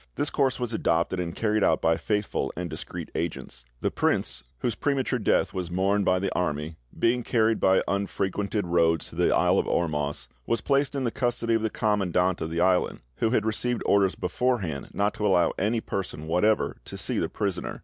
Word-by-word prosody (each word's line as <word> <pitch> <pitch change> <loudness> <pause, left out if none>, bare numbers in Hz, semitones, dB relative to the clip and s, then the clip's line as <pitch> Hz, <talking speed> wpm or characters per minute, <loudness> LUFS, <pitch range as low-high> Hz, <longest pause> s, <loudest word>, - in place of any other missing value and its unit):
"This - - -1
course 135 -2 +1
was 120 -2 -2
adopted, 85 -2 +1
and 85 -2 -3
carried 110 -1 +1
out - - +3
by 80 0 +3
faithful 105 +3 -1
and 90 -1 -4
discreet - - -7
agents. 80 -6 -5 0.2
The - - 0
prince, - - 0 0.2
whose 120 - 0
premature 130 0 0
death 105 - +1
was 90 -3 -3
mourned 95 +3 +1
by 95 - +3
the 95 +1 -1
army, 75 -2 -2 0.2
being 120 +2 +2
carried 115 -2 +2
by 95 0 +4
unfrequented 100 +1 -1
roads 85 -2 +2
to - - -12
the - - +2
isle - - +3
of - - -1
Ormus, 75 -3 -1 0.2
was 115 - +1
placed 140 0 +1
in 135 - -1
the 120 - 0
custody 120 -2 0
of 115 - +2
the 110 - 0
commandant 95 -4 +1
of 80 - -2
the 85 +1 -1
island, 90 0 +2 0.2
who, 115 - +1
had 115 - +1
received 120 +2 -1
orders 100 -2 +3
beforehand 100 - -1
not 100 +1 0
to 105 - -1
allow 90 -3 +3
any 110 +4 +1
person 90 -7 -4
whatever 95 +7 +1
to - - -8
see - - -2
the - - -1
prisoner. 100 -3 -3
100 Hz, 195 wpm, -26 LUFS, 85-115 Hz, 0.2 s, by